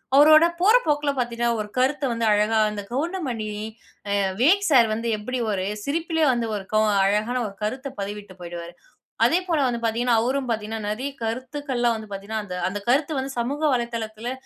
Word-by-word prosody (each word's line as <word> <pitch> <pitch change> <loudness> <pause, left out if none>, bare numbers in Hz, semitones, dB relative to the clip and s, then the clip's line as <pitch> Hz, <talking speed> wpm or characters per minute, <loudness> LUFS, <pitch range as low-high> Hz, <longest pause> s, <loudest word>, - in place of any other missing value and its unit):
அவரோட 310 +3 +8
போற 420 +6 +5
போக்கில 295 -1 +1
பார்த்தீங்கன்னா, 235 -1 0
ஒரு 210 - -7
கருத்த 275 +3 +1
வந்து 230 -1 -1
அழகா 210 +2 +2
அந்த 205 -1 -5
கவுண்டமணி 270 - -2 0.7
அ - - +2 0.2
விவேக் 390 +10 +4
சார் 245 -6 +6
வந்து 230 +2 -3
எப்படி 255 +5 -4
ஒரு 185 -2 -1 0.2
சிரிப்பிலேயே 320 +2 0
வந்து 235 -1 -1
ஒரு 195 -2 -5 0.4
அழகான 215 +5 +1
ஒரு 200 - -10
கருத்த 260 +6 -3
பதிவிட்டு 205 -1 -6
போய்டுவார், 170 0 -7 0.5
அதே 295 +9 +4
போல 325 -3 +2
வந்து 235 -1 -2
பார்த்தீங்கன்னா 230 +1 +1
அவரும் 260 +3 -1
பார்த்தீங்கன்னா 220 0 -3
நிறைய 255 +6 -3
கருத்துக்கள் 260 +3 -3
எல்லாம் 240 -1 +3
வந்து 215 -1 -9
பார்த்தீங்கன்னா 205 +3 -4 0.3
அந்த 205 - -4
கருத்து 285 +5 +2
வந்து 265 +1 -3
சமூக 275 +5 -2
வலைதளத்தில 235 -1 -3
240 Hz, 165 wpm, -24 LUFS, 215-280 Hz, 0.7 s, அவரோட